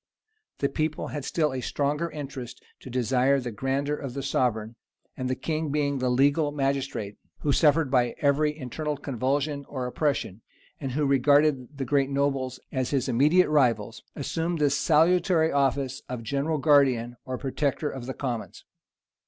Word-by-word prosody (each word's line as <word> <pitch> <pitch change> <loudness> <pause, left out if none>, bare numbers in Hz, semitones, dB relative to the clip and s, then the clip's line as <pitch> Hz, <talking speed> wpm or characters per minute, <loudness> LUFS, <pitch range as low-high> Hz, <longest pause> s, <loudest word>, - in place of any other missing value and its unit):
The 140 - +1
people 155 +2 -2
had 145 - -5
still 155 -4 0
a 130 - -3
stronger 150 +6 -1
interest 135 -5 -7 0.2
to - - -11
desire 130 +2 +2
the 125 -2 -5
grandeur 135 +6 -1
of 135 -4 -7
the 140 - -3
sovereign; 115 -4 0 0.4
and 130 -1 -3
the 130 - 0
king, 155 +1 -2
being 140 -1 0
the 130 0 0
legal 145 +4 +3
magistrate, 135 -7 -2 0.2
who 145 - +1
suffered 150 -1 +3
by 125 -2 +2
every 150 +1 +2
internal 150 +2 -4
convulsion 140 +2 -1
or 130 -3 -4
oppression, 125 - -1 0.4
and 135 -3 -4
who 150 +2 +1
regarded 140 0 +3
the 135 - -2
great 140 +1 +2
nobles 135 -2 -1
as 130 -2 -1
his 135 -2 0
immediate 150 +9 +4
rivals, 120 -6 +1
assumed 165 +4 -2
the 145 -2 +2
salutary 160 +3 +3
office 135 -1 0
of 125 -2 -5
general 140 +6 -1
guardian 135 -5 +3
or 130 0 -4
protector 140 +3 -1
of 125 -2 -7
the 130 - -4
commons. 120 -5 -5
140 Hz, 160 wpm, -26 LUFS, 130-150 Hz, 0.4 s, immediate